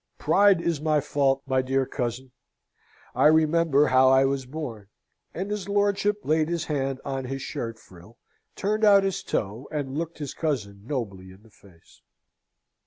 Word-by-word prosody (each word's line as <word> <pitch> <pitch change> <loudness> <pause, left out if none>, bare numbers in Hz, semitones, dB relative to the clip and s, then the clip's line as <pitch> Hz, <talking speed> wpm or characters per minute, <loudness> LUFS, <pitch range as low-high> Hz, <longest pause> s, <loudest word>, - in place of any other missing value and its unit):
Pride 200 -3 +4
is 165 -4 -1
my 155 -1 +2
fault, 140 -1 0
my 130 -1 +1
dear 135 +1 0
cousin. 125 0 -4 0.8
I - - +4
remember 155 -1 +3
how 130 -1 +5
I 135 0 +5
was 135 -1 -2
born!" 125 -8 -7 0.4
And 190 +4 -5
his 205 -2 -4
lordship 205 0 +1
laid 155 +1 +1
his 170 -1 -2
hand 135 -3 -2
on 135 -1 -3
his 135 +1 -5
shirt 115 -7 -5
frill, 95 +2 -17 0.4
turned 215 +2 -1
out 200 -2 +6
his 195 -1 -1
toe, 110 +5 -3
and 140 -3 -4
looked 165 0 -5
his 145 -3 -6
cousin 105 -11 -3
nobly 100 -10 -4
in 95 +3 -16
the 110 - -21
face. 95 - -22
140 Hz, 165 wpm, -25 LUFS, 125-165 Hz, 0.8 s, out